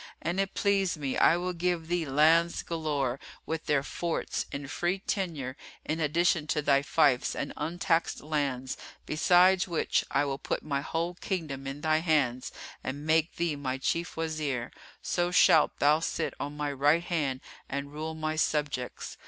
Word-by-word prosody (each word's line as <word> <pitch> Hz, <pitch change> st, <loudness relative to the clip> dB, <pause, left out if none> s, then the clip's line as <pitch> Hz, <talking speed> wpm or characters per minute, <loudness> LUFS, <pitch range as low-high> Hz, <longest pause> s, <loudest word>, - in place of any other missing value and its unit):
An 170 Hz, +4 st, -2 dB
it 195 Hz, -1 st, -1 dB
please 195 Hz, -4 st, +1 dB
me, 140 Hz, -3 st, -2 dB
I 170 Hz, -, +5 dB
will 180 Hz, +1 st, -2 dB
give 175 Hz, -1 st, -1 dB
thee 175 Hz, -2 st, -1 dB
lands 160 Hz, +5 st, +3 dB
galore, 145 Hz, -6 st, -1 dB, 0.3 s
with 160 Hz, 0 st, -4 dB
their 140 Hz, -2 st, +2 dB
forts, 170 Hz, +3 st, -3 dB
in 140 Hz, 0 st, -5 dB
free 175 Hz, +6 st, -1 dB
tenure, 165 Hz, -10 st, -3 dB, 0.3 s
in 160 Hz, +2 st, -2 dB
addition 160 Hz, +1 st, +2 dB
to 150 Hz, +1 st, 0 dB
thy 140 Hz, -1 st, +4 dB
fiefs 145 Hz, -4 st, +2 dB
and 140 Hz, -, -4 dB
untaxed 165 Hz, +2 st, 0 dB
lands; 140 Hz, -4 st, -2 dB, 0.3 s
besides 180 Hz, +4 st, +4 dB
which 170 Hz, -3 st, +1 dB
I 140 Hz, +1 st, +2 dB
will 135 Hz, -1 st, -3 dB
put -, -, -3 dB
my 140 Hz, -2 st, -1 dB
whole 165 Hz, +4 st, -2 dB
kingdom 155 Hz, -7 st, -4 dB
in 135 Hz, +2 st, -5 dB
thy 155 Hz, 0 st, +2 dB
hands 145 Hz, -7 st, +1 dB, 0.3 s
and 145 Hz, +3 st, -5 dB
make 160 Hz, +1 st, +2 dB
thee 170 Hz, -3 st, 0 dB
my 135 Hz, -2 st, -3 dB
Chief 170 Hz, +6 st, -2 dB
Wazir; 155 Hz, -7 st, -2 dB, 0.3 s
so 175 Hz, 0 st, 0 dB
shalt 180 Hz, -, +5 dB
thou 150 Hz, +2 st, +4 dB
sit 165 Hz, -, -2 dB
on 145 Hz, +1 st, -5 dB
my 145 Hz, -1 st, -1 dB
right 145 Hz, +5 st, +3 dB
hand 145 Hz, -7 st, -1 dB, 0.3 s
and 140 Hz, +1 st, -4 dB
rule 160 Hz, +1 st, -4 dB
my 155 Hz, 0 st, -2 dB
subjects. 150 Hz, -5 st, -2 dB
155 Hz, 165 wpm, -29 LUFS, 140-170 Hz, 0.3 s, I